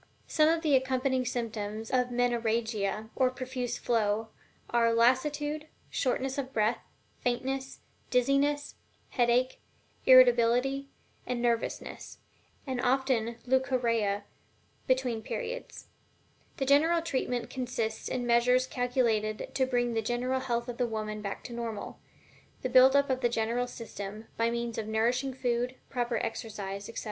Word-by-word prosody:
Some 310 -1 +3
of 330 0 +1
the 300 -3 +4
accompanying 260 0 +1
symptoms 220 -3 -4
of 250 -1 +2
Menorrhagia, 225 -3 0
or 260 -1 +3
profuse 255 -1 -4
flow, 220 -1 0 0.4
are 235 -1 +3
lassitude, 295 +5 +2 0.2
shortness 265 +1 -1
of 265 -1 -4
breath, 220 -1 +1 0.4
faintness, 265 +2 -2 0.3
dizziness, 275 +3 +2 0.4
headache, 245 +1 +2 0.5
irritability 255 +2 +5 0.4
and 250 -1 -1
nervousness, 235 -1 -2 0.5
and 260 -3 -2
often 255 -2 +2
also 235 0 -7
leucorrhea 240 -6 +1 0.6
between 255 -3 +1
periods. - - -5 0.7
The 270 - -1
general 320 +5 +4
treatment 250 -6 -2
consists 240 -4 -3
in 245 -1 -2
measures 245 +2 +4
calculated 240 -4 0
to 260 -1 +1
bring 245 -2 +1
the 225 - +1
general 245 +3 -1
health 240 -2 -2
of 245 0 -6
the 245 - +2
woman 215 -1 -4
back 200 -1 -5
to - - -8
the - - -6
normal. 225 -3 -5 0.6
The 255 - 0
building 260 +2 +7
up 280 -1 0
of 260 0 -1
the 240 - +3
general 235 +2 0
system, 215 -2 -7
by 230 0 +1
means 235 -1 -3
of 215 - -4
nourishing 245 +4 0
food, 245 0 -1 0.2
proper 240 -1 -1
exercise, 205 -3 -4
etc. 230 - -5
245 Hz, 135 wpm, -30 LUFS, 230-260 Hz, 0.7 s, building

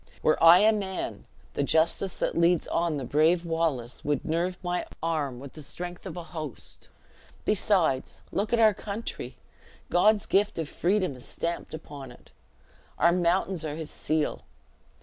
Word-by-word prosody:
Were 155 - +3
I 170 +3 +9
a 220 +1 +6
man, 195 -3 -4 0.3
the - - -1
justice 160 +6 +1
that - - -1
leads 170 0 +3
on 165 -2 0
the 135 - -4
brave 160 +6 +3
Wallace 160 -8 -1
would 145 -2 -1
nerve 175 +3 -1
my 175 0 -1 0.2
arm 150 -6 -1
with 135 0 -10
the 155 - -10
strength 175 +5 -7
of 180 - -7
a 175 - -5
host. 155 -6 -9 0.6
Besides, 180 -10 +1
look 205 +2 -1
at 235 - +3
our 220 -2 +6
country; 205 +3 -6 0.5
God's 205 +3 +4
gift 205 +2 +2
of 165 -2 -2
freedom 185 -2 0
is 125 - -10
stamped 170 -1 -3
upon 145 -4 -9
it. 120 - -17 0.7
Our 170 - +5
mountains 180 0 +1
are 150 -2 -3
his 160 -1 -6
seal. 155 -1 -1
170 Hz, 160 wpm, -27 LUFS, 155-185 Hz, 0.7 s, I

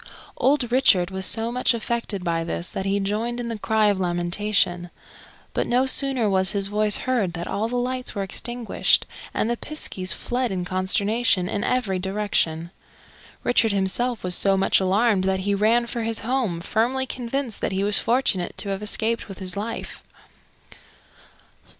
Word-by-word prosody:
Old 265 -3 +2
Richard 195 -8 +4
was 190 0 -1
so 225 +1 -1
much 250 0 +1
affected 230 -4 -3
by 165 -2 -1
this 170 +1 -3
that 195 - -4
he 200 +1 +1
joined 220 +5 -2
in 235 -1 -4
the 225 -2 -4
cry 220 0 +2
of 205 -2 +2
lamentation. 175 0 0 0.6
But - - -1
no 250 +2 +2
sooner 265 -3 +4
was 190 -1 +2
his 200 -1 0
voice 210 0 +3
heard 235 -9 0
than 170 0 -5
all 215 +3 -1
the 245 - -4
lights 250 0 -2
were 200 - -1
extinguished 240 +4 0 0.3
and - - -1
the 240 - 0
piskies 195 -12 -3
fled 245 -1 -2
in 180 -2 -3
consternation 195 +2 +1
in 205 +2 -2
every 210 -7 0
direction. 180 -4 -1 0.7
Richard 225 -3 +3
himself 200 +5 0
was 180 -1 +2
so 195 +1 +3
much 190 - +3
alarmed 195 +1 +2
that 190 0 0
he 200 +1 0
ran 220 +4 +3
for 235 0 -4
his 225 0 -2
home, 225 -8 -1
firmly 245 +7 0
convinced 250 -1 -4
that - - -1
he 190 +1 -1
was 205 0 +4
fortunate 230 -7 0
to 200 - -1
have 195 0 -3
escaped 220 +2 -1
with 195 -3 -9
his 185 0 -1
life. 220 +3 -5
210 Hz, 170 wpm, -23 LUFS, 190-240 Hz, 0.7 s, Richard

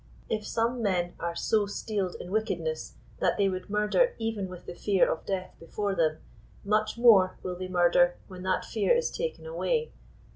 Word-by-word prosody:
If 215 -1 -2
some 235 +2 0
men 180 -4 0
are 170 0 -3
so 210 +3 +1
steeled 200 -2 -3
in 180 - -8
wickedness 225 - -2 0.2
that - - +1
they 200 -1 +3
would 185 +1 -4
murder 210 - +2
even 225 -4 -2
with 180 -1 -10
the - - -6
fear 195 +1 +2
of 160 - -3
death 185 -2 -3
before 200 +4 -3
them, 160 -4 +1 0.5
much 215 +2 +1
more 210 -6 +6
will 180 -1 -3
they 185 +1 -5
murder 175 -1 +4
when 185 -2 -10
that 185 0 0
fear 225 - +2
is 480 0 0
taken 480 0 -4
away." 485 -1 -1
200 Hz, 180 wpm, -28 LUFS, 185-225 Hz, 0.5 s, more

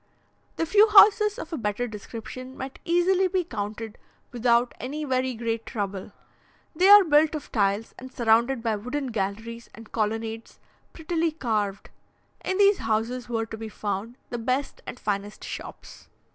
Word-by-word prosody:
The 330 - -1
few 420 +6 +5
houses 420 +1 +6
of 430 - -7
a - - -1
better 215 +2 -2
description 235 +4 -8
might 265 +1 -7
easily 360 +2 +3
be 370 0 0
counted 220 -4 -6 0.3
without 240 0 +2
any 290 +5 -4
very 260 -2 0
great 225 0 -2
trouble; 200 -4 -5 0.6
they 370 +4 +4
are 410 0 +10
built 310 -1 +3
of 300 - -7
tiles, 200 0 0
and 260 0 -10
surrounded 235 +1 +2
by 225 -2 0
wooden 255 +5 -4
galleries 225 +3 -4
and 225 0 -13
colonnades 225 +1 -3 0.3
prettily 330 0 -1
carved. 215 -9 -2 0.5
In 375 - -1
these 400 0 +5
houses 230 +2 -2
were 225 -1 -1
to 220 0 -8
be 220 0 -6
found 210 +3 -4 0.2
the 240 - -3
best 255 +4 -2
and 250 - -7
finest 205 0 -3
shops. - - -9
240 Hz, 155 wpm, -26 LUFS, 220-305 Hz, 0.6 s, are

